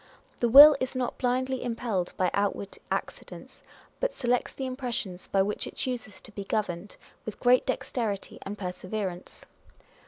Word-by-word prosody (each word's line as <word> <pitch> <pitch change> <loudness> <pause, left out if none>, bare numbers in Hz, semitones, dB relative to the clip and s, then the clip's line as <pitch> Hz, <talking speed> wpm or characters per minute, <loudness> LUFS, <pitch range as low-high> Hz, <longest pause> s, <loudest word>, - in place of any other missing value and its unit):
The 240 - +2
will 290 +4 +11
is 260 0 -2
not 255 -1 -2
blindly 255 +1 0
impelled 230 -7 -2
by 185 -1 +1
outward 200 0 -1
accidents, - - -6 0.4
but - - -1
selects 245 -1 0
the 270 - -5
impressions 245 -8 -4
by 195 -1 +2
which 205 +2 -2
it - - -10
chooses 245 -5 -4
to - - -10
be 200 -1 -6
governed, 195 -2 -3 0.3
with 220 - -7
great 250 0 +4
dexterity 230 -5 -3
and 205 +2 -6
perseverance. 185 0 -5
225 Hz, 150 wpm, -28 LUFS, 195-255 Hz, 0.4 s, will